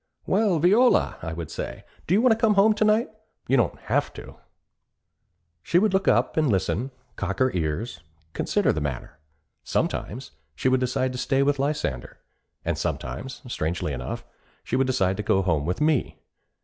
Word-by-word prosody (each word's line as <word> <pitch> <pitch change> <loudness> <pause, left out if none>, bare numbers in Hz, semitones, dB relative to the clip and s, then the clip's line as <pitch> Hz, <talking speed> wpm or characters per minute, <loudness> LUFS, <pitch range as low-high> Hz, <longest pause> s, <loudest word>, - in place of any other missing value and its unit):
'Well, 195 -3 +2
Viola,' 210 - +4
I 80 - -4
would 80 -1 -6
say, - - -6 0.2
'do 180 - +3
you 220 - +3
want 255 - +6
to - - +5
come 220 -2 +2
home 210 +2 +5
to 215 - 0
night? 215 +2 +3 0.4
You 135 - +3
don't 120 -5 +2
have - - 0
to.' - - -10 1.3
She 170 - +1
would 205 +1 +3
look 190 +1 +1
up - - +3
and 155 -3 +3
listen, 95 +4 0 0.3
cock 100 -1 -3
her 130 0 +2
ears, 85 +4 -2 0.3
consider - - +1
the 80 - -3
matter. 70 +1 -5 0.4
Sometimes 130 +5 -2 0.2
she 130 - +1
would 130 0 +3
decide 130 +1 0
to 125 - -5
stay 135 +2 +2
with 140 0 +1
Lysander, 140 - -2 0.5
and - - -1
sometimes, 120 - -4
strangely 80 -7 -2
enough, 60 -1 -5 0.4
she - - -2
would 135 0 +2
decide 95 -7 +1
to - - -1
go 95 -1 +2
home 80 -5 0
with 90 - -1
me. 150 -4 +1
130 Hz, 175 wpm, -25 LUFS, -, 1.3 s, want